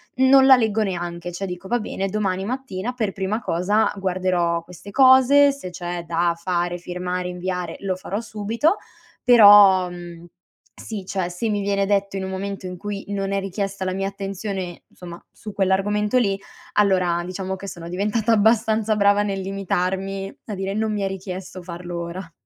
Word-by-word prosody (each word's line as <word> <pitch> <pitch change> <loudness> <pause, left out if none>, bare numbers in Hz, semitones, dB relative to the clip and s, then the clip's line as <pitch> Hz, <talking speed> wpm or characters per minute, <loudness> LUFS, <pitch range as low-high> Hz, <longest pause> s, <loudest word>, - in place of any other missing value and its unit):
non 265 +1 +6
la 265 - +9
leggo 220 -2 +1
neanche, 175 -2 -4
cioè 185 +3 -4
dico: 180 0 -7
"Va 240 - +1
bene, 195 -3 -3
domani 190 -2 -1
mattina 245 -3 -4
per 220 -5 -1
prima 195 +3 -2
cosa 205 +4 +1
guarderò 180 -3 0
queste 180 +3 -12
cose, 265 +3 +6
se 275 -10 -8
c'è 175 0 -5
da 170 +1 +1
fare, 175 0 -2
firmare, 180 +1 -4
inviare 180 -1 -4
lo 190 -2 -1
farò 190 +2 -4
subito." 230 - 0 0.5
Però, 205 -5 +8
mhmm, 175 -1 -10 0.5
sì, 205 -4 -7
cioè, 185 -3 -2
se 180 +6 -3
mi 205 -1 0
viene 200 0 0
detto 200 -1 0
in 190 - -3
un 190 - -4
momento 195 0 -5
in 180 - -7
cui 205 +1 -5
non 195 -1 -2
è 195 - +1
richiesta 195 0 -4
la 185 - -1
mia 195 +1 -2
attenzione, 195 -2 -5
insomma, 175 -1 -11
su 215 - -9
quell'argomento 205 +4 +1
lì 200 -4 0 0.3
allora 185 -4 +2
diciamo 190 +1 -4
che 195 +1 -9
sono 170 -2 -8
diventata 210 +5 0
abbastanza 220 0 +3
brava 205 0 +4
nel 195 -1 -2
limitarmi 195 0 -2
a 210 - -4
dire: 195 +1 -3
"Non 215 0 -1
mi 205 - -2
è - - +1
richiesto 185 -1 -6
farlo 175 0 -6
ora." 170 0 -7
195 Hz, 175 wpm, -22 LUFS, 180-210 Hz, 0.5 s, la